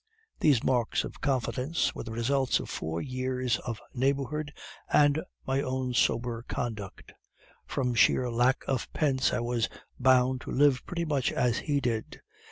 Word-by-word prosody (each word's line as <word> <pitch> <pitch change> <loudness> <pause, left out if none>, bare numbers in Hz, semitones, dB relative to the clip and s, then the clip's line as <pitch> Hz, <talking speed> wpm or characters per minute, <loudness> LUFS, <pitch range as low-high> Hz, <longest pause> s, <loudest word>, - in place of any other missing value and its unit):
These 140 -7 +4
marks 120 -4 +1
of - - -8
confidence 135 +3 0
were - - -6
the 115 - -7
results 130 +4 +1
of - - -6
four 80 +1 -3
years 130 -1 -1
of 115 -3 -5
neighborhood 140 +3 -1 0.4
and 145 +1 +4 0.2
my 135 +1 +1
own 130 -2 -2
sober 120 -1 +1
conduct. 105 -5 -5 0.5
From 125 -3 -1
sheer 125 +2 +4
lack 120 +3 +2
of 130 -3 -2
pence, 135 -4 +2
I - - 0
was 120 -1 0 0.3
bound 130 0 +4
to - - -7
live 140 -2 +3
pretty 170 -1 -2
much 140 -5 0
as 120 -2 +1
he 145 -1 0
did. 115 -4 -3
130 Hz, 155 wpm, -29 LUFS, 120-140 Hz, 0.5 s, These